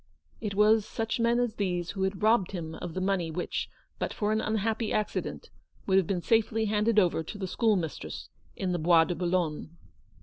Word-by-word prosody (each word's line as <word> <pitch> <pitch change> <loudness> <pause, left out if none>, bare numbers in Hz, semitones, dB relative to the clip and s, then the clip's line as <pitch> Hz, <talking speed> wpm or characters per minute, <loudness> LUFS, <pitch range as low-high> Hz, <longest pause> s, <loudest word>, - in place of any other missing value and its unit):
It 205 -3 -4
was 210 +1 +5
such 225 +3 -3
men 235 +1 +3
as 245 -3 0
these 180 -3 -1
who 195 - -5
had 190 +1 -1
robbed 215 -4 +3
him 160 -3 -5
of 165 0 -7
the - - -1
money 185 -3 0
which, 175 +2 -3 0.3
but - - -2
for 210 0 0
an 215 0 +1
unhappy 220 +1 -1
accident, 215 - -2 0.3
would 190 -1 +4
have 185 - -1
been 180 -3 -1
safely 225 0 +2
handed 215 +1 +1
over 180 -5 +4
to 165 +6 -7
the 195 - -3
schoolmistress 185 - -1 0.3
in 185 -2 -2
the 175 - -1
Bois 165 0 +5
de 175 - -2
Boulogne. 170 -2 -2
195 Hz, 195 wpm, -29 LUFS, 175-220 Hz, 0.3 s, was